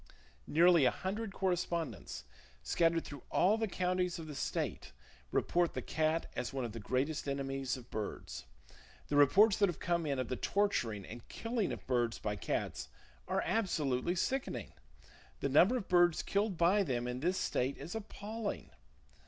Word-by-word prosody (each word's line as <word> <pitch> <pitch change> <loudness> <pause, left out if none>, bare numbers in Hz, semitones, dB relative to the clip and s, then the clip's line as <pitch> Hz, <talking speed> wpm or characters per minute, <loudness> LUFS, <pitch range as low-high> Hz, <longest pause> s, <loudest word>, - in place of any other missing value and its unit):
Nearly 170 -2 +6
a - - +6
hundred 195 - -3
correspondents, 175 -4 -2 0.4
scattered 165 - +2
through 145 -3 -8
all 195 +4 +4
the 225 - +1
counties 180 -1 0
of 165 - -7
the 155 - -7
state, 135 - -3 0.4
report 175 -1 +1
the - - -2
cat 155 +1 0
as 125 - -2
one 135 -3 -2
of 115 - -5
the 115 - -6
greatest 135 +7 -1
enemies 135 -2 -2
of 125 -1 -13
birds. 105 - -5 0.6
The 145 - 0
reports 195 +9 +6
that 200 -2 +4
have 175 - -4
come 170 -2 0
in 140 -2 0
of 130 -2 -1
the 125 - -2
torturing 120 - 0
and 115 +1 -10
killing 230 -3 -2
of - - -6
birds 120 -2 +1
by 105 -1 -2
cats 100 - -3 0.4
are - - 0
absolutely 165 - 0
sickening. 185 - -2 0.7
The - - -1
number 180 - +5
of 205 - -5
birds 175 -2 +4
killed 200 -2 0
by 180 +5 +4
them 125 -9 -1
in 125 0 -3
this 180 +6 +1
state 130 -4 0
is 170 - -7
appalling. 215 0 -5
165 Hz, 165 wpm, -34 LUFS, 130-190 Hz, 0.7 s, Nearly